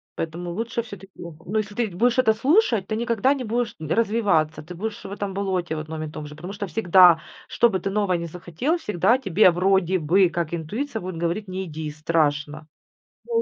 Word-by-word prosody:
Поэтому 170 Hz, +2 st, -4 dB
лучше 230 Hz, +5 st, -2 dB
все-таки, 200 Hz, -4 st, -11 dB
ну, 170 Hz, +5 st, -6 dB
если 210 Hz, -1 st, -2 dB
ты 235 Hz, -1 st, 0 dB
будешь 235 Hz, +6 st, +2 dB
это 220 Hz, -4 st, +4 dB
слушать, 250 Hz, -, +2 dB
ты 215 Hz, -, -2 dB
никогда 235 Hz, +3 st, +1 dB
не 265 Hz, -3 st, -4 dB
будешь 235 Hz, 0 st, -2 dB
развиваться, 160 Hz, -4 st, +1 dB
ты 180 Hz, +4 st, -9 dB
будешь 215 Hz, +4 st, -5 dB
в 195 Hz, -, -8 dB
этом 200 Hz, -1 st, -4 dB
болоте, 185 Hz, -4 st, -2 dB
в 155 Hz, -, -3 dB
одном 155 Hz, 0 st, -5 dB
и 155 Hz, -, -5 dB
том 150 Hz, -, -7 dB
же. 150 Hz, 0 st, -10 dB
Потому 175 Hz, +5 st, -8 dB
что 200 Hz, -1 st, -5 dB
всегда, 180 Hz, -5 st, +6 dB, 0.3 s
чтобы 220 Hz, -5 st, +2 dB
ты -, -, -2 dB
новое 200 Hz, -2 st, +1 dB
не 170 Hz, -, -4 dB
захотел, 180 Hz, -, -2 dB
всегда 225 Hz, -, +2 dB
тебе 195 Hz, -5 st, +4 dB
вроде 185 Hz, 0 st, +2 dB
бы, 175 Hz, +4 st, +3 dB
как 170 Hz, -1 st, -3 dB
интуиция 220 Hz, -, -4 dB
будет 180 Hz, -2 st, -6 dB
говорить: 175 Hz, +4 st, -2 dB
"Не 190 Hz, +1 st, -4 dB
иди, 155 Hz, -2 st, -6 dB
страшно". 155 Hz, -1 st, -1 dB, 0.6 s
Ну, 465 Hz, -1 st, +1 dB
190 Hz, 195 wpm, -23 LUFS, 165-220 Hz, 0.6 s, всегда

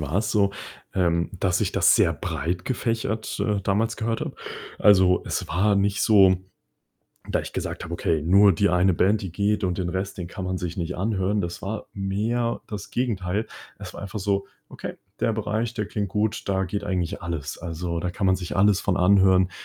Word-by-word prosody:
war 75 Hz, +3 st, -2 dB
es 105 Hz, +1 st, 0 dB
so, 100 Hz, -2 st, +3 dB, 0.4 s
ähm, 85 Hz, -2 st, +1 dB
dass 90 Hz, -2 st, +1 dB
ich -, -, 0 dB
das -, -, +5 dB
sehr -, -, +4 dB
breit 85 Hz, +5 st, -3 dB
gefächert, 115 Hz, -3 st, -2 dB
äh, 105 Hz, -2 st, +1 dB
damals 110 Hz, +4 st, 0 dB
gehört 115 Hz, 0 st, -2 dB
habe. -, -, -4 dB, 0.4 s
Also, 95 Hz, -3 st, +5 dB
es -, -, -2 dB
war 100 Hz, +6 st, +2 dB
nicht 100 Hz, +1 st, +1 dB
so, 95 Hz, -4 st, +6 dB, 0.9 s
da -, -, +1 dB
ich -, -, -9 dB
gesagt -, -, -4 dB
habe: -, -, -6 dB
„Okay, 80 Hz, -2 st, 0 dB
nur 95 Hz, +4 st, +6 dB
die 100 Hz, +4 st, +2 dB
eine 90 Hz, +1 st, +3 dB
Band, 100 Hz, +5 st, +2 dB
die 95 Hz, -4 st, -5 dB
geht 105 Hz, +3 st, 0 dB
und 90 Hz, -2 st, 0 dB
den 90 Hz, -2 st, -1 dB
Rest, 95 Hz, +2 st, -3 dB
den 90 Hz, -, -5 dB
kann 95 Hz, +1 st, -6 dB
man 95 Hz, 0 st, -2 dB
sich 90 Hz, -1 st, -5 dB
nicht 85 Hz, 0 st, -3 dB
anhören", 100 Hz, 0 st, 0 dB
das 85 Hz, 0 st, -5 dB
war 105 Hz, +2 st, -5 dB
mehr 110 Hz, +5 st, -1 dB
das 105 Hz, -3 st, -6 dB
Gegenteil. 105 Hz, -4 st, -1 dB, 0.3 s
Es -, -, -9 dB
war -, -, -9 dB
einfach 100 Hz, +1 st, -5 dB
so: 100 Hz, 0 st, 0 dB, 0.2 s
„Okay, -, -, -7 dB, 0.2 s
der 115 Hz, -1 st, +1 dB
Bereich, 110 Hz, +2 st, -2 dB
der 110 Hz, -3 st, -2 dB
klingt 105 Hz, -1 st, -3 dB
gut, 105 Hz, +2 st, -1 dB
da 95 Hz, -1 st, +1 dB
geht 100 Hz, +3 st, -3 dB
eigentlich 95 Hz, 0 st, -2 dB
alles. 85 Hz, -5 st, -4 dB
Also, 85 Hz, 0 st, -4 dB
da 90 Hz, +1 st, -2 dB
kann 95 Hz, +1 st, -1 dB
man 95 Hz, -, +4 dB
sich 90 Hz, -2 st, -5 dB
alles 100 Hz, 0 st, +4 dB
von 95 Hz, -2 st, 0 dB
anhören," 95 Hz, -1 st, +4 dB
95 Hz, 200 wpm, -24 LUFS, 90-105 Hz, 0.9 s, so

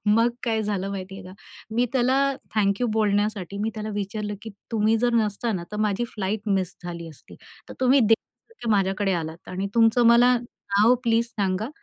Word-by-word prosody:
मग 230 Hz, +3 st, +4 dB
काय 225 Hz, -2 st, 0 dB
झालं 200 Hz, -2 st, -2 dB
माहिती 195 Hz, -1 st, -6 dB
आहे 195 Hz, -, -11 dB
का? 185 Hz, -, -10 dB, 0.4 s
मी 245 Hz, +1 st, +2 dB
त्याला 255 Hz, 0 st, +2 dB, 0.4 s
थँक 200 Hz, 0 st, +1 dB
यू 245 Hz, -, +2 dB
बोलण्यासाठी 205 Hz, -2 st, 0 dB
मी 215 Hz, +2 st, -1 dB
त्याला 215 Hz, 0 st, -5 dB
विचारलं 210 Hz, +1 st, -3 dB
की 220 Hz, -, -7 dB, 0.2 s
तुम्ही 220 Hz, +1 st, +3 dB
जर 240 Hz, +1 st, +1 dB
नसत 215 Hz, 0 st, 0 dB
ना 175 Hz, -2 st, -4 dB
तर -, -, -3 dB
माझी 215 Hz, +2 st, 0 dB
फ्लाइट 205 Hz, +1 st, -2 dB
मिस 190 Hz, -2 st, 0 dB
झाली 170 Hz, -1 st, -6 dB
असती. 155 Hz, -, -15 dB, 0.3 s
तर -, -, -9 dB
तुम्ही 260 Hz, +1 st, +5 dB
देवासारखे 225 Hz, -, -1 dB
माझ्याकडे 195 Hz, -1 st, +1 dB
आलात. 165 Hz, -1 st, -5 dB
आणि 190 Hz, +2 st, -3 dB
तुमचं 230 Hz, +1 st, +4 dB
मला 245 Hz, +2 st, +6 dB
नाव 225 Hz, -1 st, +1 dB
प्लीज 230 Hz, 0 st, +2 dB
सांगा. 205 Hz, -2 st, -2 dB
210 Hz, 185 wpm, -24 LUFS, 195-230 Hz, 0.4 s, मला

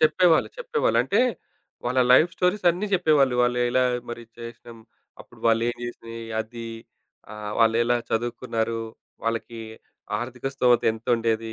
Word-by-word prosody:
చెప్పేవాళ్ళు, 160 Hz, +2 st, +4 dB
చెప్పేవాళ్ళు. 475 Hz, -2 st, +1 dB
అంటే, -, -, +1 dB, 0.6 s
వాళ్ళ 125 Hz, +1 st, +1 dB
లైఫ్ 160 Hz, +7 st, +6 dB
స్టోరీస్ 180 Hz, +2 st, +1 dB
అన్నీ 185 Hz, +5 st, -3 dB
జెప్పేవాళ్ళు. 150 Hz, -8 st, +3 dB
వాళ్ళు 120 Hz, 0 st, +1 dB
ఎలా 130 Hz, +1 st, +3 dB, 0.3 s
మరి 120 Hz, 0 st, -6 dB, 0.2 s
చేసినాం, 115 Hz, 0 st, -10 dB, 0.4 s
అప్పుడు -, -, -16 dB
వాళ్లేం 115 Hz, +1 st, +2 dB
చేసినయి, 115 Hz, -1 st, -7 dB, 0.2 s
అది 115 Hz, +1 st, -7 dB, 0.7 s
ఆహ్, 105 Hz, -1 st, -6 dB
వాళ్ళేలా 115 Hz, +2 st, +3 dB
చదువుకున్నారు, 115 Hz, -1 st, -2 dB, 0.4 s
వాళ్ళకి 115 Hz, 0 st, -3 dB, 0.6 s
ఆర్థిక 125 Hz, +1 st, -6 dB
స్తోమత 125 Hz, -2 st, +3 dB
ఎంతుండేది 115 Hz, -1 st, -1 dB
120 Hz, 120 wpm, -25 LUFS, 115-135 Hz, 0.7 s, లైఫ్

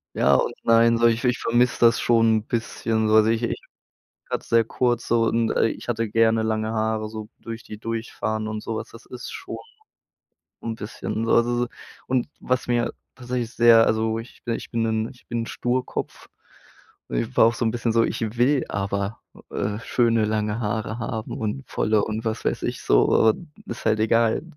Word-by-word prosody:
Ja -, -, +4 dB
und -, -, +1 dB
nein 115 Hz, 0 st, +5 dB
so 120 Hz, -, +3 dB
ich 115 Hz, +1 st, +1 dB
ich 125 Hz, 0 st, +2 dB
vermisse 120 Hz, +1 st, +2 dB
das 115 Hz, -1 st, +5 dB
schon 115 Hz, -2 st, +4 dB
'n 105 Hz, -, -3 dB
bisschen 115 Hz, -1 st, -1 dB
so. 110 Hz, -, +4 dB
Also 110 Hz, 0 st, +6 dB
ich 115 Hz, +1 st, +1 dB
ich -, -, -2 dB, 0.7 s
grad -, -, -2 dB
sehr 115 Hz, 0 st, +3 dB
kurz 120 Hz, 0 st, 0 dB
so 115 Hz, 0 st, +3 dB
und, 115 Hz, 0 st, +1 dB
äh, -, -, +3 dB
ich -, -, -7 dB
hatte 115 Hz, -2 st, -1 dB
gerne 115 Hz, 0 st, +3 dB
lange 110 Hz, 0 st, -1 dB
Haare, 110 Hz, -1 st, -1 dB
so 110 Hz, -1 st, -7 dB
durch 115 Hz, 0 st, -7 dB
die 105 Hz, -, -9 dB
durchfahren 110 Hz, -1 st, -3 dB
und 110 Hz, 0 st, -4 dB
sowas. 110 Hz, -1 st, -4 dB
Das 115 Hz, -, -14 dB
ist 125 Hz, -1 st, -8 dB
schon -, -, -7 dB, 1.0 s
und 115 Hz, -1 st, -5 dB
bisschen. 110 Hz, +1 st, -4 dB
Also 120 Hz, +1 st, +3 dB
so -, -, -8 dB, 0.4 s
und 130 Hz, 0 st, 0 dB
was 125 Hz, 0 st, -1 dB
mir 120 Hz, -1 st, +1 dB, 0.2 s
tatsächlich 125 Hz, -2 st, -3 dB
sehr 115 Hz, -1 st, +6 dB
also 110 Hz, 0 st, +1 dB
wo 110 Hz, -, -1 dB
ich 115 Hz, -, -14 dB
ich 115 Hz, -, -3 dB
bin 115 Hz, -1 st, -1 dB
'nen 110 Hz, 0 st, 0 dB
ich 125 Hz, -, -18 dB
bin 120 Hz, -1 st, -2 dB
'n -, -, -11 dB
Sturkopf. 125 Hz, +1 st, -3 dB, 0.8 s
Und -, -, -3 dB
ich 65 Hz, -, -3 dB
war 110 Hz, -, +7 dB
auch 115 Hz, -, +2 dB
so 115 Hz, -, -2 dB
'n 110 Hz, -, +2 dB
bisschen 115 Hz, -1 st, -1 dB
so: 115 Hz, 0 st, +4 dB
„Ich -, -, -2 dB, 0.2 s
will 130 Hz, +2 st, +3 dB
aber, 100 Hz, +2 st, -2 dB, 0.3 s
äh, 105 Hz, 0 st, -2 dB
schöne 115 Hz, -2 st, +2 dB
lange 105 Hz, +1 st, -1 dB
Haare 110 Hz, +1 st, -2 dB
haben 110 Hz, -1 st, -4 dB
und 110 Hz, +5 st, -3 dB
volle 110 Hz, -1 st, +1 dB
und 110 Hz, +1 st, -4 dB
was 110 Hz, 0 st, -3 dB
weiß -, -, -1 dB
ich -, -, -3 dB
so, 110 Hz, -, +4 dB
äh -, -, -8 dB, 0.4 s
ist 115 Hz, -, -6 dB
halt 110 Hz, -1 st, +2 dB
egal 115 Hz, +3 st, +2 dB
115 Hz, 200 wpm, -24 LUFS, 110-120 Hz, 1.0 s, war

